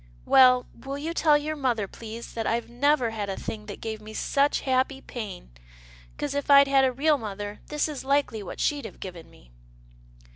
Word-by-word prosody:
" - - -27
Well, 255 -1 +7 0.2
will 275 +1 -4
you 320 +4 -4
tell 305 -3 +4
your 305 +1 -3
mother, 245 -8 0
please, 230 +3 -9
that 225 -1 -3
I've 235 +1 0
never 255 -1 +2
had 210 -2 -4
a 195 - -3
thing 210 -1 -6
that 205 - -7
gave 220 -1 -5
me 215 +1 -10
such 280 +1 +1
happy 260 +1 0
pain, 205 - -8 0.7
'cause 290 -1 -3
if 285 0 -3
I'd 280 0 +8
had 275 -1 +4
a 260 - +3
real 290 +3 +2
mother, 205 -1 -6
this 300 +1 0
is 300 -3 -6
likely 275 -5 +1
what 195 - -8
she'd 290 -4 0
have - - -10
given 175 -4 -9
me." - - -20
255 Hz, 205 wpm, -26 LUFS, 215-285 Hz, 0.7 s, I'd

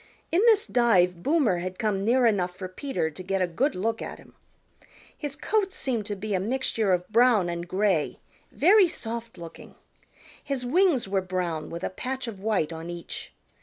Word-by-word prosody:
In 345 - +3
this 435 -3 +5
dive 180 -8 +3
Boomer 275 - +2
had 185 +1 -5
come 210 -4 -1
near 245 +4 +3
enough 185 -5 +1
for 185 - -5
Peter 185 - -3
to 170 - -10
get 195 +1 -1
a 185 - +3
good 250 - 0
look 225 +5 -1
at - - -6
him. - - -18 0.8
His 290 -2 -5
coat 390 +6 0
seemed 235 - -2
to 205 - -3
be 205 +2 -4
a 190 - +2
mixture 225 -1 0
of 180 -1 +1
brown 225 -5 +4
and 170 0 -4
gray, 185 -4 0 0.3
very 380 +4 +5
soft 230 - -6
looking. 170 -1 -11 0.7
His 275 -3 -3
wings 310 - +3
were 195 0 0
brown 180 -4 -3
with 170 +2 -7
a - - -2
patch 260 +6 -4
of 210 -4 -7
white 190 -6 0
on 165 +1 -7
each. 175 -1 -7
210 Hz, 185 wpm, -26 LUFS, 180-255 Hz, 0.8 s, this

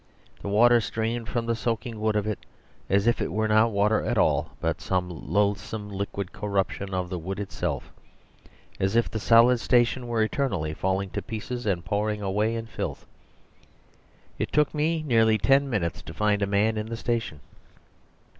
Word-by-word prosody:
The - - -6
water 120 +3 +5
streamed 110 +2 -3
from 120 -2 -1
the 115 0 0
soaking 115 0 -3
wood 110 0 +1
of 105 -1 +1
it 105 -2 -2 0.5
as 100 +2 +3
if 120 +1 +2
it - - -2
were 110 0 0
not 110 +2 +4
water 105 +1 +2
at - - -1
all, - - +2
but - - -1
some 90 -1 -1
loathsome 100 +5 -1
liquid 100 -1 -4
corruption 100 -1 -2
of 90 -1 -1
the 90 - -2
wood 95 +4 -5
itself; 100 - -3 0.9
as 95 +3 0
if 115 - +2
the 110 - -3
solid 115 +3 +5
station 120 +1 +2
were 115 -2 +1
eternally 110 - -1
falling 95 +3 -1
to - - -3
pieces 115 +2 -5
and 85 -4 0
pouring 105 +2 -1
away 105 +4 0
in 115 0 -4
filth. 110 - -5 1.3
It - - -2
took 150 -1 +2
me 155 +1 0
nearly 115 -4 +4
ten 135 +5 +3
minutes 85 - -1
to 80 - -10
find 105 +1 +1
a 100 - +1
man 105 +2 +2
in 105 0 -3
the 115 0 -5
station. 115 -10 -2
110 Hz, 175 wpm, -26 LUFS, 100-115 Hz, 1.3 s, water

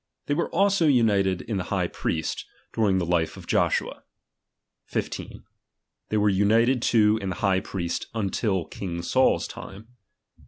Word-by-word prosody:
They 145 - 0
were 170 - -1
also 195 -4 +3
united 100 -8 +2
in 110 -3 -3
the 90 - -3
high - - 0
priest, 80 -1 -3 0.3
during 105 -4 +2
the 90 - 0
life 85 -1 0
of - - -11
Joshua. - - 0 0.9
15. - - -5 0.7
They 110 - 0
were 105 0 +3
united 115 +6 +3
too 110 -2 +3
in 95 - -3
the 95 - -3
high 95 -1 +1
priest 85 -3 -4
until 100 -3 -1
king 85 -3 -6
Saul's - - +2
time. 105 +4 -10
100 Hz, 150 wpm, -25 LUFS, 95-115 Hz, 0.9 s, also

